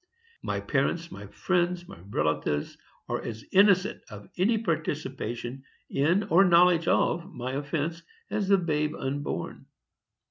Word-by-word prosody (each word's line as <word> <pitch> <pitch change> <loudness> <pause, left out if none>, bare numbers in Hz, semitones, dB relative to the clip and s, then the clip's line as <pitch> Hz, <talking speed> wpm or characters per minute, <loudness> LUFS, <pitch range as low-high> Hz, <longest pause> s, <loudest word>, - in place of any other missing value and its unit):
My - - -2
parents, - - -1
my - - -9
friends, 175 -1 -1
my - - -11
relatives, 75 -3 -1 0.3
are - - -2
as 110 -1 -7
innocent 195 0 +4
of 105 -2 -11
any 215 +6 +2
participation 135 - -3 0.3
in 170 +9 +2
or 195 -1 +5
knowledge 175 -2 +5
of 175 +3 +1
my 125 -2 -5
offence 150 +4 -2 0.3
as 205 -2 -1
the 200 0 +5
babe 150 -4 -1
unborn. 140 +2 -4
165 Hz, 130 wpm, -27 LUFS, 135-180 Hz, 0.3 s, or